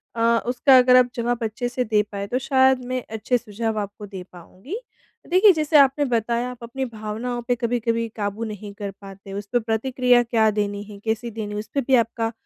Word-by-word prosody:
अ, 230 0 +3
उसका 255 +2 +5
अगर 250 0 +6
आप 250 -1 +4
जवाब 240 0 -1
अच्छे 240 +3 -3
से 250 +1 -1
दे 215 -2 +2
पाएँ 200 0 -4
तो 250 +4 -1
शायद 265 -1 +3
मैं 255 0 -2 0.2
अच्छे 245 +4 +1
सुझाव 220 0 -3
आपको 205 +1 -6
दे 190 -2 -8
पाऊँगी। 185 - -9 0.5
देखिए 380 +3 +6
जैसे 310 -1 +2
आपने 280 +1 +4
बताया 235 0 0
आप 240 -1 -12
अपनी 265 +3 -4
भावनाओं 230 +2 -5
पे 245 - +2
कभी-कभी 230 -1 -1
काबू 205 +1 -3
नहीं 210 -2 -7
कर 200 -1 -6
पाते, 195 0 -11
उस 200 0 -5
पे 245 - +3
प्रतिक्रिया 245 +2 +2
क्या 225 -2 +2
देनी 205 -1 -2
है, 205 -1 -11
कैसी 225 +2 -1
देनी 210 -1 -5
है, - - -4
उसपे 275 +6 -3
भी 265 +1 +3
आपका 230 -1 0
230 Hz, 200 wpm, -23 LUFS, 210-250 Hz, 0.5 s, अगर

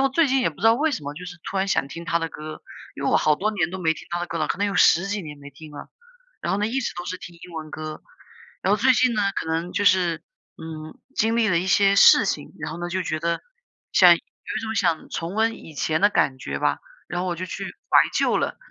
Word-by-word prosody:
我 - - +1
最 300 +2 +2
近 265 0 +2
也 205 - +1
不 150 - -19
知 - - -9
道 225 - +6
为 300 +4 +1
什 155 - -3
么， 145 +1 -6
就 180 +4 -9
是 180 -1 -8
突 195 - -4
然 190 - +1
想 140 -8 0
听 170 +4 -8
他 170 0 0
的 165 - -2
歌， 155 0 -9 0.3
因 - - -7
为 - - +1
我 - - +4
好 155 - +3
多 210 +7 -1
年 180 -6 -1
都 190 - -5
没 160 -3 +2
听 160 - -11
他 175 0 -2
的 175 - -3
歌 165 - -3
了， 155 - 0
可 - - -2
能 205 - 0
有 195 - -3
10 175 +3 +5
几 205 +1 -2
年 150 -5 -8
没 145 0 -11
听 150 +2 -13
了。 145 - -9 0.5
然 - - -2
后 195 - 0
呢， 210 - +1
一 250 +4 -1
直 255 - -2
都 175 - -5
是 185 - -4
听 175 - -10
英 175 +1 -13
文 155 -1 -6
歌。 155 0 -7 0.6
然 195 - +2
后 210 - +2
最 260 - +6
近 250 0 +3
呢， 210 - +1 0.2
可 - - -5
能 165 +2 -2
就 205 - 0
是， 180 -4 +3 0.3
嗯， 155 -1 -9 0.2
经 225 +1 +2
历 225 - +3
了 170 -1 +3
一 185 - -3
些 200 0 +4
事 200 - +7
情， 150 -7 -3
然 155 0 -5
后 165 - -7
呢 175 0 -4
就 185 +1 -2
觉 155 -2 -2
得， 170 +1 -1 0.5
想 - - +7
有 - - 0
一 - - -8
种 220 0 -4
想 175 -7 0
重 170 +4 -4
温 225 +1 +2
以 160 - -12
前 155 +4 0
的 205 - +6
感 135 -9 +1
觉 - - -4
吧。 - - 0 0.3
然 175 0 -3
后 185 - -2
我 175 - -1
就 185 +2 -5
去 190 +2 -6 0.3
怀 - - +6 0.2
旧 - - +2
了， - - -2
175 Hz, 305 characters per minute, -23 LUFS, 160-205 Hz, 0.6 s, 事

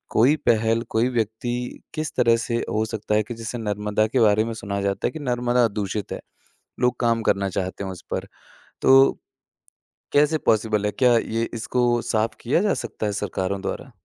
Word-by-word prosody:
कोई 130 +7 +5
पहल, 115 0 +3
कोई 115 +3 +2
व्यक्ति 120 +1 -3
किस 155 -1 -3
तरह 115 -2 +4
से 115 +1 -2
हो 110 - 0
सकता 110 -1 -2
है 110 - +3
कि 120 - -7
जैसे 115 +1 -5
नर्मदा 105 -1 0
के 125 +4 0
बारे 110 -1 +4
में 115 - -4
सुना 100 -2 -4
जाता 100 0 0
है - - -3
कि 160 - -7
नर्मदा 125 -3 +1
दूषित 105 -1 -4
है। - - -5 0.6
लोग 125 0 +1
काम 115 -1 +2
करना 100 -2 +1
चाहते 95 +1 -3
हैं 95 - -4
उस 90 - -9
पर, - - -3 0.5
तो 135 +1 +7 1.0
कैसे 150 +2 +4
पॉसिबल 110 -1 +2
है? 105 - +1
क्या 125 0 +4
ये 115 0 -1
इसको 120 +1 +1
साफ़ 115 -2 -1
किया 130 +8 +2
जा 205 -1 +2
सकता 120 -2 -4
है 105 - 0
सरकारों 100 -1 -2
द्वारा? - - -5
115 Hz, 190 wpm, -23 LUFS, 105-120 Hz, 1.0 s, तो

